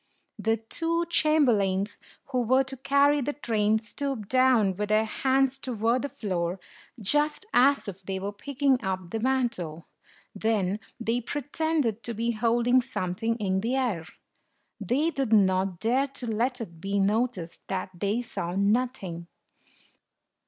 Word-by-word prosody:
The 225 0 +1
two 330 +9 -1
chamberlains 215 - +2 0.3
who 255 -2 +1
were 260 +3 +3
to 265 0 -5
carry 280 +2 +3
the 290 +3 -2
train 220 -6 +1
stooped 230 -1 -4
down 255 -7 +4
with 210 +2 -3
their 215 +1 +3
hands 270 +3 +1
toward 235 -1 0
the 285 - -3
floor, 180 -5 -3 0.4
just 295 - +2
as 275 0 +4
if 195 -1 -7
they 190 0 -4
were 200 +2 -3
picking 270 +4 0
up 185 -2 -3
the 225 - -2
mantle; 225 -11 -1 0.5
then 205 -2 0 0.2
they 230 +1 0
pretended 290 -3 -1
to 235 -1 -4
be 230 +2 0
holding 235 +3 +3
something 220 +1 -2
in 190 -4 -1
the 235 +5 0
air. 220 -12 -1 0.7
They 265 - +1
did 270 -7 -2
not 190 -3 +3
dare 255 +5 +2
to 270 -2 -5
let 240 +3 0
it 170 -7 -8
be 200 +1 -1
noticed 205 -3 -1
that 190 0 -3
they 205 +7 -1
saw 175 -6 -4
nothing. 200 -5 0
230 Hz, 145 wpm, -27 LUFS, 195-265 Hz, 0.7 s, down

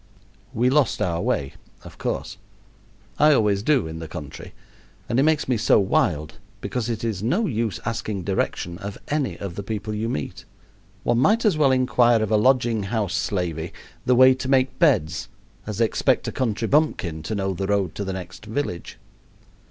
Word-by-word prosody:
We 125 0 +1
lost 140 -4 +2
our 85 -1 0
way, 70 -5 -1 0.3
of - - -13
course. - - -3 0.8
I 150 +1 +6
always 105 -6 +2
do 135 - +2
in 80 0 -6
the 80 - -6
country, 75 -2 -9 0.5
and 120 - +1
it - - +5
does - - +3
make 160 -2 +1
me 125 -2 +1
so 110 - +4
wild, 80 -6 0 0.2
because 115 +4 -3
it 115 -1 -3
is 110 -5 -2
no 175 - +1
use 115 - -2
asking 110 -4 -3
direction 90 -2 -2
of 100 -1 -6
any 145 -2 -1
of 100 -3 -6
the 100 - -5
people 105 +1 -4
you 110 +2 -2
meet. 75 - -4 0.6
One 120 0 +2
might 220 - +3
as 210 - +4
well 145 -3 +4
inquire 120 -3 +3
of 110 - -3
a - - +4
lodging 120 -1 +3
house 105 -5 -1
slavey 90 -4 -2 0.3
the 125 - +3
way 130 +1 +7
to 130 0 -5
make 130 -1 +2
beds 100 - +2 0.4
as 105 0 -4
expect 115 -3 +1
a - - -2
country 115 -3 -1
bumpkin 105 - +1
to 95 +8 -4
know 95 -1 -1
the 95 +2 -3
road 100 -5 0
to 100 - -4
the 95 -1 -3
next 95 +3 -8
village. 110 -7 -4
110 Hz, 185 wpm, -23 LUFS, 95-130 Hz, 0.8 s, way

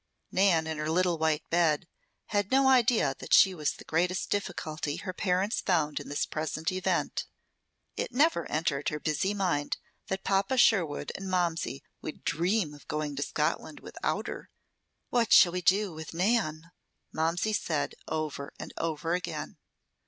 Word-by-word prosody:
Nan, 185 -4 +3
in 160 -1 -4
her 155 0 -2
little 175 0 +2
white 160 -1 0
bed, 170 -1 +2 0.4
had 205 -2 0
no 265 0 +4
idea 235 - +4
that - - +3
she 190 - +7
was 150 -5 -1
the - - -12
greatest 180 +4 0
difficulty 155 -6 -2
her 185 - -5
parents 190 +3 0
found 155 -6 +1
in - - -9
this 145 - 0
present 155 +1 -2
event. 185 0 -1 0.7
It - - -3
never 300 +7 +2
entered 150 -2 0
her 150 - -4
busy 165 +7 0
mind 175 -7 0 0.3
that 190 0 -3
Papa 200 +7 +1
Sherwood 175 -12 +3
and 195 0 -6
Momsey 170 -6 -1 0.2
would 155 - -7
dream 170 +1 0
of 145 - -15
going 150 -1 -2
to - - -2
Scotland - - -2
without - - -3
her. - - -7 0.6
"What 235 -2 +2
shall 175 - +8
we 180 +1 -2
do 195 +1 +2
with 160 +1 -8
Nan?" 175 -5 0 0.4
Momsey 170 +7 0
said 155 -7 -1
over 155 -3 -3
and - - -7
over 165 +1 -1
again. 175 -1 -4
170 Hz, 160 wpm, -29 LUFS, 155-195 Hz, 0.7 s, shall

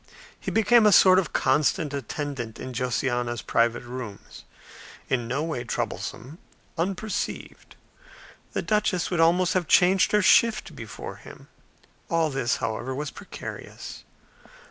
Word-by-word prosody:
He - - -4
became 225 0 +5
a - - +6
sort 185 -1 +7
of 180 - -3
constant 150 +2 +1
attendant 135 -3 -5
in 130 0 -6
Josiana's 120 -1 -1
private 115 +1 +1
rooms; 120 -4 -9 0.6
in 120 -3 0
no 135 +5 -1
way 155 -7 -3
troublesome; 140 - -5 0.4
unperceived; 195 +4 -4 0.8
the - - -2
duchess 210 -5 0
would 175 - 0
almost 170 +2 +4
have 180 -3 0
changed 185 +1 +4
her 210 -1 +3
shift 230 +2 +3
before - - -8
him. - - -14 0.6
All 165 -3 +1
this, 135 -3 0
however, 115 +3 -3
was 145 +1 -4
precarious. - - -9
150 Hz, 125 wpm, -25 LUFS, 125-185 Hz, 0.8 s, sort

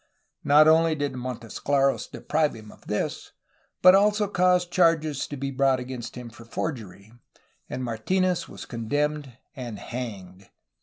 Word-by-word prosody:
Not 150 +2 +6
only 160 0 +4
did 145 -2 -2
Montesclaros 130 +2 -1
deprive 150 0 -1
him 110 -1 -12
of - - -19
this, - - -3 0.5
but 185 0 +9
also 210 +1 +3
caused 180 -2 +2
charges 160 -5 +2
to 145 - -6
be 135 +1 -3
brought 135 -1 +2
against 125 -2 -7
him 125 -2 -8
for 115 - -13
forgery, 110 - -6 0.6
and 130 - -4
Martinez 180 - 0
was - - -9
condemned 145 +2 -2 0.2
and 120 -5 -6
hanged. 100 -7 -7
135 Hz, 140 wpm, -25 LUFS, 120-160 Hz, 0.6 s, but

